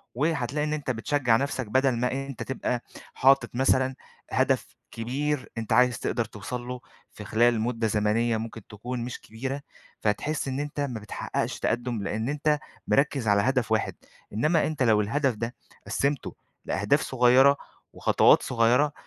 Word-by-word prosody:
وهتلاقي 150 -1 0
إن 150 - -1
أنت 150 -3 -2
بتشجع 120 0 +2
نفْسَك 135 -3 -2
بدل 130 +5 +3
ما 125 +1 0
أنت 135 -1 -4
تبقى 125 -2 -2 0.3
حاطط 135 -2 +4
مثلًا 130 0 +2 0.4
هدف - - +1 0.2
كبير 135 +4 -2
أنت 115 0 -2
عايز 125 +1 +4
تقدر 120 - -1
توصل 110 +4 -6
له، 125 0 -5 0.3
في - - -10
خلال 115 0 +3
مدة 115 -1 0
زمنية 110 +2 +1
ممكن 110 -1 -7
تكون 120 +4 -5
مش 125 - -6
كبيرة، 130 +5 -5 0.4
فتحس 140 +9 -1
إن 135 +1 -2
أنت 145 0 -4
ما 130 -5 -2
بتحققش 105 - -3
تقدم؛ 120 -2 -1
لأن 110 +4 -2
أنت 150 0 +1 0.3
مِركِّز 140 -4 +2
على 100 -1 +4
هدف 125 0 +1
واحد، 110 0 +1 0.4
إنما 155 +10 +2
أنت 155 -4 -1
لو 110 -3 +4
الهدف 135 +5 +1
ده 115 +3 -4 0.3
قسِّمته 140 0 -1 0.3
لأهداف 105 +9 +1
صغيرة 130 +2 +5 0.4
وخطوات - - +4
صغيرة، 125 +5 +3
125 Hz, 150 wpm, -27 LUFS, 115-140 Hz, 0.4 s, صغيرة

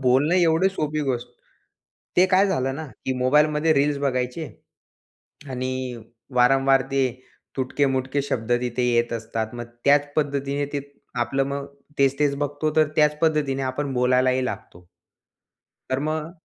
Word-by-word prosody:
बोलणं 135 +6 +3
एवढी 175 +1 +4
सोपी 155 -4 -2
गोष्ट. 120 0 -3 0.9
ते 185 +1 +6
काय 190 +2 +5
झालं 135 -8 0
ना 160 - -6 0.2
की 130 - +1
मोबाईलमध्ये 150 +4 +3
रील्स 145 0 +2
बघायचे. 130 +2 -1 1.1
आणि 130 -1 -3 0.4
वारंवार 135 +2 +4
ते 135 -1 +2 0.5
तुटके-मुटके 135 +1 0
शब्द 120 -4 -2
तिथे 125 0 -2
येत 120 0 +1
असतात. 115 0 -4
मग 120 - -5 0.2
त्याच 145 0 +3
पद्धतीने 140 -1 -1
ते 140 - 0 0.4
आपलं 135 +3 0
मग 140 0 -4 0.3
तेच-तेच 140 +1 +2
बघतो 145 +2 -1
तर 155 -1 +4
त्याच 150 -1 +3
पद्धतीने 150 -4 +1
आपण 135 +1 -2
बोलायलाही 125 +1 +2
लागतो. 90 -7 -7 1.0
तर 130 - +1
मग 155 +2 -2
135 Hz, 130 wpm, -24 LUFS, 130-150 Hz, 1.1 s, ते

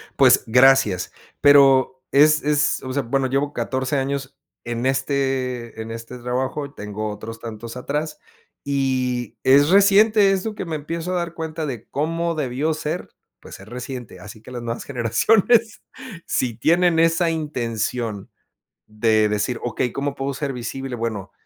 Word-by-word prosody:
Pues - - +5
gracias, 125 -6 +4 0.3
pero 135 -2 +5
es 155 +2 +5
es, 150 0 +1
o 130 0 -5
sea, 140 - 0
bueno, 135 +3 0
llevo 140 +2 -1
14 130 +3 -2
años 135 0 -3 0.3
en 120 +1 -3
este 130 -3 -1
en 110 - -7
este 115 +2 -8
trabajo 130 +4 -2
y 140 - -12
tengo 105 +1 -5
otros 110 +2 -8
tantos 115 +1 -8
atrás 150 +4 -3 0.4
y 130 -4 -1
es 140 +3 +5
reciente 200 +1 +5
eso 195 +3 -1
que - - -5
me 165 -2 -4
empiezo 165 +4 -4
a - - 0
dar 170 -1 -3
cuenta 160 -1 -4
de 125 -6 -6
cómo 165 +3 -1
debió 145 +2 -1
ser, 155 +3 -4 0.3
pues, - - -12
es 95 - -13
reciente. 125 -1 -7
Así 105 +1 -11
que 120 - -13
las 120 -1 -6
nuevas 115 0 -4
generaciones, 205 - +2 0.5
sí 120 -3 -1
tienen 170 +6 +3
esa 165 +1 +3
intención 120 -8 -3 0.6
de 110 0 +2
decir: 105 +3 -1
"Okey, 120 0 -2
¿cómo 140 0 -3
puedo 135 0 -3
ser 140 0 -3
visible?". 125 +1 -5
Bueno, 110 -4 -4
135 Hz, 155 wpm, -22 LUFS, 120-150 Hz, 0.6 s, Pues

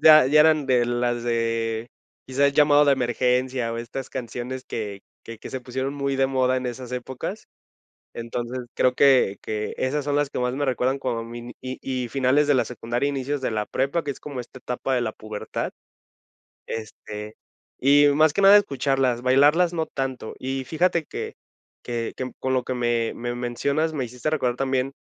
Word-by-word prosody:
ya 155 -3 +9
ya 150 +3 +5
eran 155 -2 +4
de 125 -2 +3
las 120 0 0
de 115 -1 -1 0.4
quizás, 140 +2 +2
"Llamado 145 0 +5
de 140 - +5
emergencia" 125 -1 0
o - - -4
estas 125 +3 -6
canciones 125 +1 -5
que 105 -3 -5 0.2
que 115 -1 -9
que - - -9
se 130 - -4
pusieron 130 +2 -3
muy 140 -1 -1
de 135 0 +3
moda 130 -1 +1
en 130 0 -2
esas 125 0 -6
épocas. 125 +1 -5 0.7
Entonces, 120 +2 -4 0.2
creo 125 0 +3
que 130 -8 +4
que 105 -1 -3
esas 140 +2 -1
son 145 0 0
las 145 -1 +2
que - - -4
más 125 0 0
me 145 +2 -1
recuerdan 130 +1 0
cuando 120 -4 -2
mini 120 +1 -8
y 130 0 -6
y 130 -2 -3
finales 135 +3 +2
de 145 - +5
la 130 - +3
secundaria, 120 +2 -2
inicios 140 +1 -2
de 130 - -1
la 105 -1 -1
prepa, 140 +5 0
que 145 - -3
es 140 - -7
como 140 -4 -6
esta 125 +1 -11
etapa 125 +1 -2
de 125 - +2
la 115 -2 -2
pubertad. 110 -1 -5 1.0
Este, 105 -1 -7 0.4
y 145 +2 +6
más 155 +1 +5
que 200 - 0
nada 195 +1 +9
escucharlas, 135 -9 +1
bailarlas 145 +7 +4
no 160 -2 -1
tanto. 130 -4 -4
Y 135 0 -3
fíjate 170 +2 +1
que - - -6 0.5
que 120 -2 -3
que 130 0 -4
con 130 0 0
lo 130 -1 +1
que 130 - -3
me 120 -2 0
me 120 0 -4
mencionas, 140 +6 -1
me 140 -4 -2
hiciste 125 +5 -3
recordar 125 -6 0
también 135 0 0
130 Hz, 190 wpm, -24 LUFS, 120-140 Hz, 1.0 s, ya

